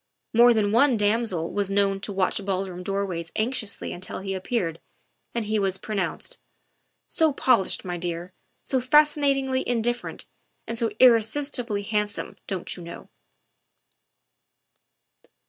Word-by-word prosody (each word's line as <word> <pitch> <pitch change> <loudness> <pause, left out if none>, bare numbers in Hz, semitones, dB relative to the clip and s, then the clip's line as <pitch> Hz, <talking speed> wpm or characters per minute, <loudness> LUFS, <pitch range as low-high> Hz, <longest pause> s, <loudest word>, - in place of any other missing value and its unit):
More 240 +2 +7
than 215 -3 +2
one 245 +2 +4
damsel 205 -5 0
was 200 -1 0
known 195 0 +1
to 210 - -4
watch 195 +1 0
ballroom 190 -2 -3
doorways 185 -4 -3
anxiously 220 -2 -1
until 180 +1 -5
he 195 0 -4
appeared, 185 -3 -2 0.6
and 230 -2 -1
he 215 0 0
was 190 -1 +1
pronounced, 210 - -3 0.4
" - - -47 0.3
So 320 -2 +2
polished, 255 -10 +2
my 175 -1 -3
dear, 175 +1 -4 0.3
so 260 -2 0
fascinatingly 275 -1 +3
indifferent, 240 0 -2 0.4
and 230 - -4
so 230 -1 0
irresistibly 235 -2 +3
handsome, 210 -1 -2
don't 190 -3 -3
you 180 - -10
know." 170 0 -10
210 Hz, 130 wpm, -25 LUFS, 190-240 Hz, 0.6 s, More